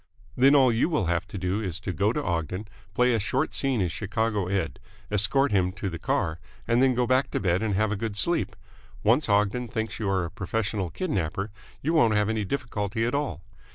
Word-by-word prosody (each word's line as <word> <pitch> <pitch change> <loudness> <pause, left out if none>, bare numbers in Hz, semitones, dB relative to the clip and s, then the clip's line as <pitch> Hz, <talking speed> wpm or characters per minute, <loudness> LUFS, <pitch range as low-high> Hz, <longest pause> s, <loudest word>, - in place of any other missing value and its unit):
Then 135 +3 +6
all 130 -3 +6
you 115 +8 +2
will 150 - +1
have 85 +1 0
to - - -7
do 95 +3 -1
is 95 -3 -3
to 95 -2 -3
go 100 +4 +2
to 150 +4 -2
Ogden, 85 +4 -2 0.3
play 125 +2 +4
a 115 - +2
short 125 +6 -1
scene 135 -6 0
as 90 -2 0
Chicago 105 -1 -1
Ed., 95 -1 -2 0.3
escort 110 +7 +2
him 95 -3 +2
to 100 -1 -4
the 85 - -6
car, 80 +1 -1 0.3
and 120 +2 +3
then 130 -1 +4
go 125 0 +2
back 130 +2 +2
to - - -1
bed 90 -1 +1
and 110 -3 0
have 110 +1 +1
a - - 0
good 105 0 -3
sleep. 170 +11 +1 0.5
Once 120 +5 +3
Ogden 105 +4 +2
thinks 110 -1 -3
you 105 -3 -1
are 95 -2 +1
a 85 - -7
professional 100 -1 -2
kidnapper, 100 - -2 0.3
you 160 +4 +1
won't 115 -10 +4
have 105 0 +2
any 110 -1 0
difficulty 115 -3 -2
at 120 - -1
all. 140 - -2
105 Hz, 220 wpm, -26 LUFS, 95-125 Hz, 0.5 s, Then